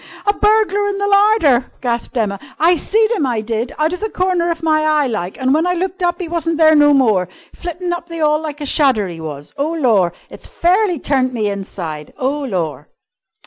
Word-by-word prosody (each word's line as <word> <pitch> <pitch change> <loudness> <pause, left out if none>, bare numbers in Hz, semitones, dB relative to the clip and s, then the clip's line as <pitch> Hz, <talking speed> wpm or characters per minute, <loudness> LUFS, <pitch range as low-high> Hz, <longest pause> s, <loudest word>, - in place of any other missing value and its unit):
"A 410 - +3
burglar 415 -1 +2
in 400 -1 -2
the 405 0 -1
larder!" 400 - +3
gasped 240 0 -3
Emma. 200 -3 -1 0.2
"I 340 +3 +4
seed 435 +6 +1
'im, 360 - 0
I 240 -3 -1
did! 225 +2 -3
Out 310 +3 +1
of 360 - -4
the 435 - -3
corner 365 -3 0
of 330 -1 -3
my 310 -1 +2
eye, 305 -2 +2
like, 205 -7 -4
and 260 0 +2
when 320 +4 +2
I 360 - +1
looked 370 +2 -3
up 350 0 0
'e 360 - -4
wasn't 330 -1 -1
there 315 -1 +5
no 290 -1 +5
more. 215 -10 +2 0.2
Flittin' 350 0 -4
up 345 0 -6
the 335 0 -6
'all 305 0 +2
like 300 -1 -6
a - - -3
shadder, 265 -8 +2
'e 170 -2 -8
was. 145 -2 -8
Oh, 295 +4 -1
lor! 225 - +2 0.2
It's - - -9
fairly 365 +1 +1
turned 260 -2 0
me 210 -3 0
inside! 170 -6 -6
Oh, 280 +3 -1
lor!" 165 - -3
305 Hz, 215 wpm, -17 LUFS, 235-350 Hz, 0.2 s, there